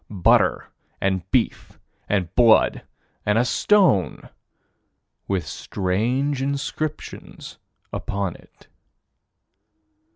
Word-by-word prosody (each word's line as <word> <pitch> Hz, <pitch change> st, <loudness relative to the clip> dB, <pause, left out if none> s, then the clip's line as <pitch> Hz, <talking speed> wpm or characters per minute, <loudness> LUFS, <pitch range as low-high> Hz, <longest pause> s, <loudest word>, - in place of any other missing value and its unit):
Butter 95 Hz, -5 st, +2 dB, 0.3 s
and 95 Hz, -3 st, -1 dB
beef -, -, -1 dB, 0.3 s
and 95 Hz, -4 st, -1 dB
blood 115 Hz, -3 st, +4 dB, 0.4 s
and 105 Hz, +1 st, +1 dB
a 120 Hz, -, +3 dB
stone 125 Hz, -, +2 dB, 1.0 s
with 95 Hz, -5 st, -1 dB
strange 115 Hz, -, -1 dB
inscriptions 140 Hz, +2 st, -5 dB, 0.3 s
upon 100 Hz, -3 st, -3 dB
it. -, -, -20 dB
105 Hz, 75 wpm, -23 LUFS, 95-135 Hz, 1.0 s, blood